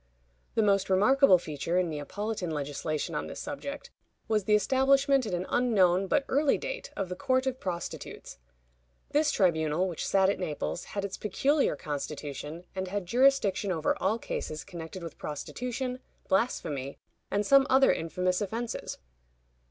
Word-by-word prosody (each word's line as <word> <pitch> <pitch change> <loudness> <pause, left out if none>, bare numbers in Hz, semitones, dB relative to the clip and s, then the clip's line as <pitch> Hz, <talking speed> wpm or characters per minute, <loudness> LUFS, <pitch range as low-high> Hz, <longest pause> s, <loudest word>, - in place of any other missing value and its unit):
The 225 - +3
most 200 -2 +2
remarkable 210 +3 +6
feature 165 +1 -3
in 185 -1 +2
Neapolitan 180 +6 -4
legislation 155 +2 -3
on 150 - -2
this - - -7
subject 285 0 -6 0.4
was 215 -3 +1
the 210 - +4
establishment 270 +3 +3
at 195 - -3
an 175 +1 -3
unknown, 195 -6 +3
but 275 - +2
early 285 +1 +3
date, - - -5
of 195 - -1
the 180 - -5
Court 260 +7 +1
of 260 -1 -2
Prostitutes. 170 - -6 0.7
This 300 +1 +3
tribunal, 165 -2 +2
which 175 -4 -4
sat 190 -1 +4
at 200 - 0
Naples, 175 0 -3
had 200 -1 -4
its 195 - -5
peculiar 275 - +1
constitution, 150 +2 -5
and 190 -1 -3
had 200 0 -3
jurisdiction 215 -3 +3
over 160 -3 +1
all 205 +4 +2
cases 155 -8 -4
connected 170 +1 -8
with 165 - -8
prostitution, 250 - -4 0.3
blasphemy, 150 - -1 0.3
and 205 +1 0
some 275 +3 +6
other 265 +1 +6
infamous 180 +3 -1
offenses. 225 +4 -4
195 Hz, 150 wpm, -29 LUFS, 170-250 Hz, 0.7 s, remarkable